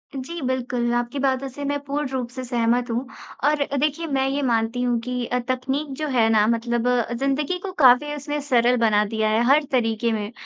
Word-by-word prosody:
जी, 315 Hz, +6 st, -6 dB
बिल्कुल। 250 Hz, -2 st, -1 dB
आपकी 240 Hz, +3 st, -2 dB
बातों 270 Hz, 0 st, 0 dB
से 285 Hz, +3 st, -8 dB
मैं 285 Hz, +1 st, -1 dB
पूर्ण 285 Hz, +1 st, -2 dB
रूप 260 Hz, -2 st, -3 dB
से 255 Hz, +1 st, -7 dB
सहमत 240 Hz, 0 st, 0 dB
हूँ, 245 Hz, +3 st, -2 dB, 0.4 s
और 295 Hz, 0 st, +3 dB
देखिए 300 Hz, +4 st, 0 dB
मैं 270 Hz, -2 st, 0 dB
ये 280 Hz, +1 st, -1 dB
मानती 235 Hz, -1 st, 0 dB
हूँ 245 Hz, -1 st, +1 dB
कि 250 Hz, 0 st, -3 dB
अ, 250 Hz, +1 st, -1 dB
तकनीक 265 Hz, +4 st, -1 dB
जो 310 Hz, -, -2 dB
है 240 Hz, -4 st, +3 dB
ना, 215 Hz, -2 st, +4 dB
मतलब 235 Hz, +1 st, 0 dB, 0.3 s
ज़िंदगी 275 Hz, +7 st, -1 dB
को 390 Hz, -, -4 dB
काफ़ी 265 Hz, +3 st, +5 dB
उसने 295 Hz, +1 st, -4 dB
सरल 250 Hz, -3 st, +2 dB
बना 215 Hz, -3 st, +3 dB
दिया 220 Hz, +1 st, -1 dB
है, 220 Hz, +1 st, +2 dB
हर 290 Hz, +3 st, +5 dB
तरीके 230 Hz, -2 st, +1 dB
में, 215 Hz, 0 st, -3 dB
250 Hz, 200 wpm, -23 LUFS, 235-280 Hz, 0.4 s, काफ़ी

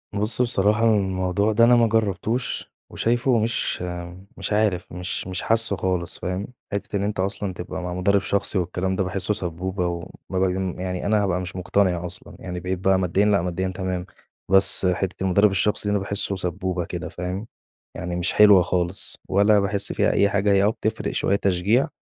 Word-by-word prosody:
بُص، 105 Hz, +4 st, +1 dB
بصراحة 105 Hz, -2 st, +2 dB
الموضوع 100 Hz, -1 st, +1 dB
ده 115 Hz, +2 st, +4 dB
أنا 120 Hz, +1 st, +6 dB
ما 115 Hz, -1 st, +4 dB
جربتوش 110 Hz, +2 st, -1 dB, 0.2 s
وشايفُه 120 Hz, +1 st, +1 dB
مش 110 Hz, -4 st, 0 dB, 0.6 s
مش -, -, -2 dB
عارف، 105 Hz, -5 st, 0 dB
مش 90 Hz, +1 st, -3 dB
مش 95 Hz, 0 st, -3 dB
حاسّه 115 Hz, -2 st, +2 dB
خالص 90 Hz, -2 st, -2 dB
فاهم، 95 Hz, +3 st, -3 dB, 0.3 s
حِتّة 100 Hz, 0 st, -4 dB
إن 100 Hz, -, 0 dB
أنت 100 Hz, -1 st, -3 dB
أصلًا 100 Hz, 0 st, -2 dB
تبقى 90 Hz, +1 st, -6 dB
مع 90 Hz, 0 st, -4 dB
مدرب 100 Hz, +2 st, +2 dB
شخصي 100 Hz, 0 st, +1 dB
والكلام 90 Hz, +2 st, -2 dB
ده 95 Hz, -, 0 dB
باحسّه 95 Hz, +2 st, -1 dB
سبّوبة 90 Hz, 0 st, -2 dB
و 85 Hz, -1 st, -4 dB, 0.2 s
وما 95 Hz, -, -1 dB
باجي 95 Hz, -1 st, -1 dB
يعني 90 Hz, -1 st, -3 dB
أنا 105 Hz, 0 st, +2 dB
هابقى 90 Hz, -2 st, 0 dB
مش 90 Hz, 0 st, -6 dB
مقتنع 90 Hz, -1 st, 0 dB
أصلًا، 90 Hz, -, -8 dB
يعني 90 Hz, -1 st, -6 dB
بقيت 90 Hz, +1 st, -3 dB
بقى 95 Hz, 0 st, +2 dB
ماديًا 95 Hz, +3 st, +1 dB
لأ، 105 Hz, -3 st, +3 dB
ماديًا 90 Hz, +2 st, -2 dB
تمام، 95 Hz, -1 st, -3 dB, 0.5 s
بس 95 Hz, 0 st, +5 dB
حِتّة 90 Hz, +1 st, -1 dB
المدرب 100 Hz, +2 st, +3 dB
الشخصي 105 Hz, +2 st, +1 dB
دي -, -, +1 dB
أنا 105 Hz, -, +1 dB
باحسُّه 100 Hz, 0 st, -1 dB
سبّوبة 90 Hz, -1 st, -2 dB
كده -, -, -5 dB
فاهم، 90 Hz, +5 st, -5 dB, 0.5 s
يعني 90 Hz, 0 st, -4 dB
مش 90 Hz, 0 st, +1 dB
حلوة 105 Hz, -3 st, +7 dB
خالص 90 Hz, +1 st, -2 dB
ولا 100 Hz, +2 st, +4 dB
باحس 100 Hz, 0 st, -1 dB
فيها -, -, +2 dB
أي 100 Hz, -, +3 dB
حاجة، 100 Hz, 0 st, +1 dB
هي 100 Hz, 0 st, +4 dB
آه 105 Hz, -, +4 dB
بتفرق 110 Hz, -1 st, -2 dB
شوية 100 Hz, -, +1 dB
تشجيع، 100 Hz, +6 st, +1 dB
95 Hz, 185 wpm, -23 LUFS, 90-105 Hz, 0.6 s, حلوة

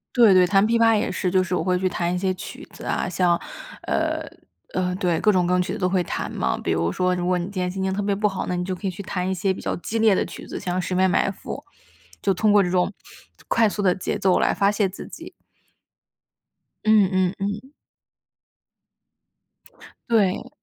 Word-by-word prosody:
对 230 Hz, -5 st, +7 dB
对， 185 Hz, -1 st, +5 dB
弹 195 Hz, +2 st, +4 dB
琵 230 Hz, +1 st, +2 dB
琶 225 Hz, -1 st, +5 dB
也 210 Hz, -, -1 dB
是。 185 Hz, 0 st, -1 dB
就 185 Hz, +1 st, +3 dB
是 185 Hz, -, -4 dB
我 170 Hz, -, -1 dB
会 180 Hz, 0 st, +1 dB
去 185 Hz, +1 st, 0 dB
弹 175 Hz, -1 st, -1 dB
一 -, -, -1 dB
些 185 Hz, 0 st, 0 dB
曲 185 Hz, +2 st, -9 dB
子 -, -, -12 dB
啊， -, -, -1 dB
像 175 Hz, -1 st, +2 dB, 0.4 s
呃， -, -, -1 dB, 0.5 s
呃， 180 Hz, 0 st, -1 dB
对， 175 Hz, -3 st, 0 dB
各 210 Hz, -, +4 dB
种 180 Hz, -3 st, +2 dB
各 180 Hz, -, +1 dB
种 180 Hz, -, +3 dB
曲 180 Hz, -, -3 dB
子 -, -, -5 dB
都 180 Hz, -, +1 dB
会 185 Hz, -1 st, +1 dB
弹 -, -, -4 dB
嘛。 -, -, -1 dB
比 -, -, -3 dB
如 85 Hz, +1 st, +1 dB
说 180 Hz, -, +1 dB
如 175 Hz, -1 st, -2 dB
果 180 Hz, 0 st, +2 dB
你 175 Hz, -, -2 dB
今 200 Hz, -, -9 dB
天 180 Hz, -, -1 dB
心 190 Hz, +1 st, -4 dB
情 190 Hz, 0 st, 0 dB
特 200 Hz, -, -1 dB
别 200 Hz, 0 st, 0 dB
不 210 Hz, +1 st, +1 dB
好， 195 Hz, -2 st, -3 dB
那 180 Hz, -, -1 dB
你 180 Hz, -, -2 dB
就 185 Hz, -, -2 dB
可 195 Hz, +2 st, -5 dB
以 -, -, +1 dB
去 190 Hz, +3 st, -8 dB
弹 185 Hz, -1 st, -2 dB
一 -, -, 0 dB
些 190 Hz, +1 st, 0 dB
比 -, -, -9 dB
较 -, -, -2 dB
激 225 Hz, +6 st, -3 dB
烈 220 Hz, -3 st, +5 dB
的 -, -, 0 dB
曲 -, -, -9 dB
子， -, -, -5 dB
像 180 Hz, 0 st, -3 dB
《十 185 Hz, -, -3 dB
面 190 Hz, +1 st, +3 dB
埋 190 Hz, -, +2 dB
伏》， 190 Hz, -, -8 dB, 0.6 s
就 195 Hz, -, +2 dB
通 210 Hz, +4 st, +2 dB
过 205 Hz, -1 st, +5 dB
这 180 Hz, -, -1 dB
种 180 Hz, +1 st, +1 dB, 0.6 s
快 225 Hz, -2 st, +3 dB
速 205 Hz, -, -3 dB
的 185 Hz, -3 st, +3 dB
节 185 Hz, -, -3 dB
奏 190 Hz, -1 st, +2 dB
来 -, -, +2 dB
发 200 Hz, 0 st, +2 dB
泄 210 Hz, -1 st, +1 dB
自 190 Hz, -, -9 dB
己。 -, -, -11 dB, 1.5 s
嗯， 215 Hz, -3 st, +5 dB
嗯， 185 Hz, -1 st, +1 dB
嗯。 205 Hz, +7 st, -4 dB, 2.4 s
对。 220 Hz, +1 st, +2 dB
185 Hz, 250 characters per minute, -23 LUFS, 180-200 Hz, 2.4 s, 对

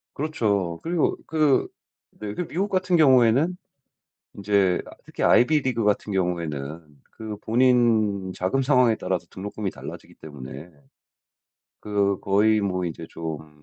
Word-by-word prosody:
그렇죠. 100 Hz, -, -1 dB
그리고 170 Hz, -1 st, 0 dB
그 155 Hz, -4 st, +2 dB, 0.5 s
네 105 Hz, -1 st, -5 dB
그 -, -, -3 dB
미국같은 185 Hz, +1 st, -1 dB
경우에는 135 Hz, +2 st, +4 dB, 0.8 s
인제 100 Hz, -2 st, +1 dB
아 -, -, -12 dB
특히 -, -, -5 dB
아이비리그 130 Hz, -4 st, +3 dB
같은 105 Hz, 0 st, 0 dB
경우에는 85 Hz, -5 st, -3 dB, 0.3 s
그 110 Hz, -2 st, -7 dB
본인 110 Hz, -5 st, +2 dB
자금 95 Hz, +9 st, 0 dB
상황에 125 Hz, -4 st, +3 dB
따라서 90 Hz, -2 st, -2 dB
등록금이 100 Hz, +1 st, -5 dB
달라지기 -, -, -10 dB
때문에 70 Hz, +1 st, -10 dB, 1.1 s
그 100 Hz, -2 st, 0 dB
거의 105 Hz, +2 st, +3 dB
뭐 90 Hz, -2 st, -1 dB
이제 85 Hz, -1 st, -6 dB
좀 80 Hz, -2 st, -6 dB
105 Hz, 275 characters per minute, -24 LUFS, 90-130 Hz, 1.1 s, 경우에는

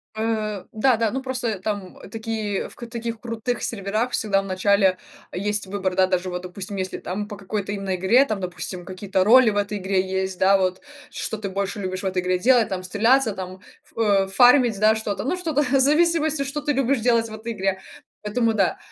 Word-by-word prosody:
Э, 215 Hz, -3 st, -2 dB
да, 235 Hz, +2 st, +2 dB
да, 225 Hz, -2 st, +1 dB
ну, 265 Hz, +1 st, -3 dB
просто 250 Hz, -6 st, -3 dB
там 200 Hz, -2 st, -4 dB
такие, 220 Hz, -3 st, -3 dB
в -, -, -16 dB
таких 235 Hz, -1 st, -6 dB
крутых 235 Hz, +1 st, -3 dB
серверах 215 Hz, +3 st, -2 dB
всегда 200 Hz, -2 st, +1 dB
в -, -, -9 dB
начале 190 Hz, 0 st, +2 dB, 0.3 s
есть 205 Hz, +1 st, -2 dB
выбор, 190 Hz, -2 st, -2 dB
да. 185 Hz, -1 st, +4 dB
Даже 185 Hz, 0 st, -1 dB
вот, 180 Hz, 0 st, -4 dB
допустим, 190 Hz, +2 st, -7 dB
если 185 Hz, 0 st, -3 dB
там 205 Hz, +3 st, -4 dB
по 205 Hz, -2 st, -8 dB
какой-то 200 Hz, 0 st, -4 dB
именно 195 Hz, -2 st, -2 dB
игре, 230 Hz, +10 st, +4 dB
там, 215 Hz, -6 st, -3 dB
допустим, 180 Hz, 0 st, -6 dB
какие-то 190 Hz, 0 st, -1 dB
роли 240 Hz, +2 st, +7 dB
в 205 Hz, -, -2 dB
этой 205 Hz, 0 st, -1 dB
игре 190 Hz, 0 st, 0 dB
есть, 190 Hz, -1 st, -2 dB
да. 195 Hz, +1 st, +5 dB
Вот 185 Hz, -1 st, -1 dB, 0.3 s
что 220 Hz, -, -4 dB
ты 200 Hz, -2 st, -5 dB
больше 200 Hz, +2 st, -3 dB
любишь 185 Hz, 0 st, -4 dB
в -, -, -4 dB
этой 185 Hz, -1 st, 0 dB
игре 180 Hz, 0 st, 0 dB
делать: 240 Hz, 0 st, +4 dB
там, 185 Hz, -1 st, -3 dB
стреляться, 225 Hz, +5 st, +2 dB
там, 185 Hz, +1 st, -7 dB, 0.3 s
э, 230 Hz, -, -2 dB, 0.2 s
ф 190 Hz, -, -11 dB
фармить, 245 Hz, -4 st, +5 dB
да, 215 Hz, +1 st, +5 dB
что-то, 215 Hz, -2 st, -3 dB
ну, 325 Hz, +8 st, -1 dB
что-то 315 Hz, -5 st, 0 dB
в 270 Hz, +1 st, +2 dB
зависимости, 310 Hz, 0 st, +3 dB
что 280 Hz, +2 st, -4 dB
ты 295 Hz, 0 st, 0 dB
любишь 270 Hz, -1 st, +1 dB
делать 230 Hz, -1 st, +2 dB
в -, -, -9 dB
этой 225 Hz, +2 st, -6 dB
игре, 195 Hz, -1 st, -1 dB, 0.4 s
поэтому 225 Hz, +2 st, 0 dB
да, 195 Hz, -4 st, +1 dB
210 Hz, 205 wpm, -23 LUFS, 190-235 Hz, 0.4 s, роли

